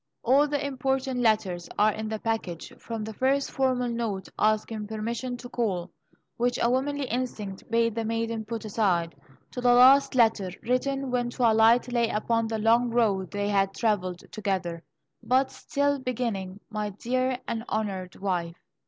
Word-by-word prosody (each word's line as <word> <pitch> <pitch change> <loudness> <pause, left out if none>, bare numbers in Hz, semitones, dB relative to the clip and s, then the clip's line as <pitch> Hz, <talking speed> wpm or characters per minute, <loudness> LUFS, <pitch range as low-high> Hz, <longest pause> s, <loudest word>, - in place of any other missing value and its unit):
All 275 +5 +4
the 290 -1 -1
important 265 -1 -1
letters 205 -7 +1
are 215 +1 +4
in 215 +1 -5
the 220 - -2
package, 215 -7 -3
from 225 -2 -5
the 220 +1 -6
first 270 +5 +1
formal 255 -2 +1
note 230 -5 -3
asking 215 0 0
permission 235 +3 -3
to 245 - -9
call, 190 -8 -2 0.5
which 245 +1 +1
a 235 - +2
womanly 280 +2 0
instinct 220 -6 -4
bade 230 0 +2
the 230 +1 -2
maiden 225 0 -2
put 225 +1 -5
aside, 185 -6 +1 0.4
to 250 - -5
the 245 0 +4
last 265 +2 +6
letter, 220 -6 +3
written 265 +2 -1
when 245 -1 0
twilight 235 0 +4
lay 235 -2 +2
upon 230 +1 0
the 220 0 -2
long 230 +3 +3
road 205 -6 +1
they 205 0 -2
had 195 -1 +1
travelled 185 -6 -1
together, 185 -5 -2 0.4
but 260 +1 +2
still 285 0 -1
beginning: 220 -7 -3
"My 210 -1 -2
Dear 255 +5 -1
and 230 -1 -3
Honoured 195 -4 -3
Wife." 175 -3 -2
225 Hz, 160 wpm, -27 LUFS, 205-250 Hz, 0.5 s, last